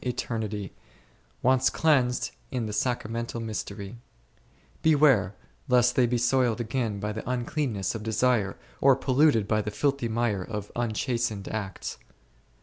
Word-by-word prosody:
eternity, 110 Hz, -5 st, -3 dB, 0.7 s
once 130 Hz, +1 st, +4 dB
cleansed 130 Hz, -6 st, +2 dB, 0.2 s
in 125 Hz, -3 st, -2 dB
the 105 Hz, -, -4 dB
sacramental 115 Hz, -1 st, -2 dB
mystery; 105 Hz, -1 st, -5 dB, 0.9 s
beware 140 Hz, -11 st, +4 dB, 0.3 s
lest 125 Hz, -2 st, +4 dB
they 125 Hz, -2 st, +4 dB
be 120 Hz, +1 st, +1 dB
soiled 120 Hz, -1 st, +2 dB
again 115 Hz, -3 st, -2 dB
by 105 Hz, +1 st, -2 dB
the 110 Hz, +3 st, -6 dB
uncleanness 120 Hz, -, -1 dB
of 110 Hz, -, -5 dB
desire, 110 Hz, -2 st, +1 dB, 0.2 s
or 135 Hz, -1 st, +6 dB
polluted 135 Hz, -4 st, +3 dB
by 105 Hz, 0 st, +2 dB
the 105 Hz, -, -3 dB
filthy 140 Hz, +2 st, 0 dB
mire 110 Hz, -4 st, 0 dB
of 105 Hz, 0 st, -6 dB
unchastened 115 Hz, -2 st, -1 dB
acts. 100 Hz, -4 st, -5 dB
115 Hz, 130 wpm, -27 LUFS, 105-125 Hz, 0.9 s, or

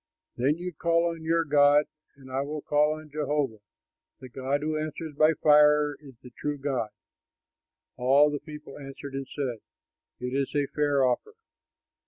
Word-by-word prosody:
Then 140 Hz, +6 st, +1 dB
you 180 Hz, +1 st, -5 dB
call 170 Hz, +2 st, +1 dB
on 165 Hz, -1 st, -8 dB
your 165 Hz, +1 st, +1 dB
god 145 Hz, 0 st, +5 dB, 0.3 s
and 135 Hz, -1 st, -14 dB
I 135 Hz, +1 st, 0 dB
will 150 Hz, +1 st, -5 dB
call 150 Hz, +1 st, +2 dB
on 155 Hz, -1 st, -12 dB
Jehovah. 145 Hz, -6 st, -1 dB, 0.6 s
The 130 Hz, -, -10 dB
god 135 Hz, +3 st, -2 dB
who 155 Hz, 0 st, -1 dB
answers 155 Hz, +1 st, -4 dB
by 155 Hz, +2 st, +4 dB
fire 150 Hz, -1 st, +5 dB
is 135 Hz, -4 st, -14 dB
the 125 Hz, -, -12 dB
true 145 Hz, +4 st, -4 dB
God." 135 Hz, -5 st, -2 dB, 1.1 s
All 140 Hz, +4 st, +4 dB
the 145 Hz, -, -3 dB
people 150 Hz, 0 st, -11 dB
answered 135 Hz, 0 st, -9 dB
and 135 Hz, -1 st, -4 dB
said, 130 Hz, -6 st, -3 dB, 0.6 s
"It 125 Hz, +1 st, -4 dB
is 140 Hz, +1 st, -1 dB
a 145 Hz, -1 st, +2 dB
fair 145 Hz, -2 st, +2 dB
offer." 130 Hz, -, -1 dB
145 Hz, 165 wpm, -27 LUFS, 135-155 Hz, 1.1 s, god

